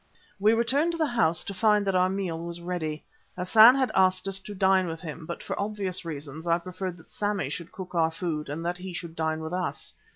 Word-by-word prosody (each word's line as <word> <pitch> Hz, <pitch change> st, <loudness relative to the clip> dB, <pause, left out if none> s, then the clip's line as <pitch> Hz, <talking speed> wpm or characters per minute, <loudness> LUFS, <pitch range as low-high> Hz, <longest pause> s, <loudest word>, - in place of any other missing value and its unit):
We 215 Hz, +3 st, +4 dB
returned 280 Hz, +9 st, +2 dB
to -, -, -3 dB
the 320 Hz, -, +2 dB
house 225 Hz, -, +2 dB
to 200 Hz, -, -5 dB
find 210 Hz, +1 st, +3 dB
that 195 Hz, -, +1 dB
our 185 Hz, 0 st, +3 dB
meal 185 Hz, -4 st, -2 dB
was 170 Hz, 0 st, -5 dB
ready. 170 Hz, -3 st, -4 dB, 0.3 s
Hassan 220 Hz, +7 st, +7 dB
had 265 Hz, -2 st, +1 dB
asked 185 Hz, 0 st, +3 dB
us 195 Hz, 0 st, 0 dB
to 205 Hz, +1 st, -9 dB
dine 190 Hz, -1 st, +3 dB
with 165 Hz, -1 st, -5 dB
him, 160 Hz, -1 st, -7 dB
but 170 Hz, -, -6 dB
for -, -, -3 dB
obvious 200 Hz, -3 st, -1 dB
reasons 155 Hz, 0 st, -7 dB
I 170 Hz, 0 st, +4 dB
preferred 185 Hz, +1 st, -5 dB
that 165 Hz, -, -19 dB
Sammy 205 Hz, -9 st, -1 dB
should 170 Hz, +2 st, -6 dB
cook 185 Hz, -1 st, -8 dB
our 165 Hz, -2 st, +3 dB
food 160 Hz, -3 st, -4 dB
and 160 Hz, +4 st, -4 dB
that 175 Hz, +1 st, -2 dB
he 185 Hz, 0 st, -7 dB
should 170 Hz, -2 st, -7 dB
dine 160 Hz, -1 st, -1 dB
with 160 Hz, +2 st, -5 dB
us. 180 Hz, 0 st, -3 dB
180 Hz, 230 wpm, -27 LUFS, 165-200 Hz, 0.3 s, Hassan